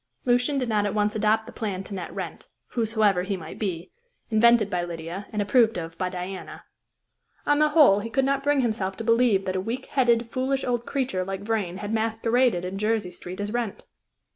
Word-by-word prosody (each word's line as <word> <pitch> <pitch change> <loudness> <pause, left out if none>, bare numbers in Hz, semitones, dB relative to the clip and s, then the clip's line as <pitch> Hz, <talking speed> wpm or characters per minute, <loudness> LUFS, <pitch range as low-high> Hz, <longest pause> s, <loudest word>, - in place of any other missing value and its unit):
Lucian 250 +3 +2
did 255 -2 -1
not 210 -2 +1
at 205 - -3
once 210 0 +1
adopt 220 +1 +2
the 240 - -10
plan 200 -6 -4
to 200 - -9
net 180 -3 -5
Wrent - - -6 0.2
whosoever 220 -5 +2
he 195 +1 -2
might 175 - -9
be 185 -4 -3 0.4
invented 230 -1 +5
by 180 -3 -1
Lydia, 170 +3 -6
and 210 -1 0
approved 225 0 +3
of 165 -1 -5
by 185 -1 0
Diana. 185 +1 -7 0.8
On 290 0 +3
the 305 0 +4
whole, 295 -10 +6
he 220 +2 -5
could 265 +3 +1
not 275 0 +1
bring 290 -1 +2
himself 210 -5 -1
to 225 - -4
believe 230 -4 +3
that 185 - -2
a 185 - 0
weak 240 +6 -4
headed, 235 -3 +2
foolish 265 +1 -1
old 240 -1 -1
creature 255 -10 -1
like 195 +1 -5
Vrain 205 -4 -2
had 205 +2 -4
masqueraded 225 -2 +1
in 190 +2 -4
Jersey 210 -3 0
Street 180 +1 -9
as 205 +1 -3
Wrent. 235 -4 -3
215 Hz, 205 wpm, -25 LUFS, 190-240 Hz, 0.8 s, whole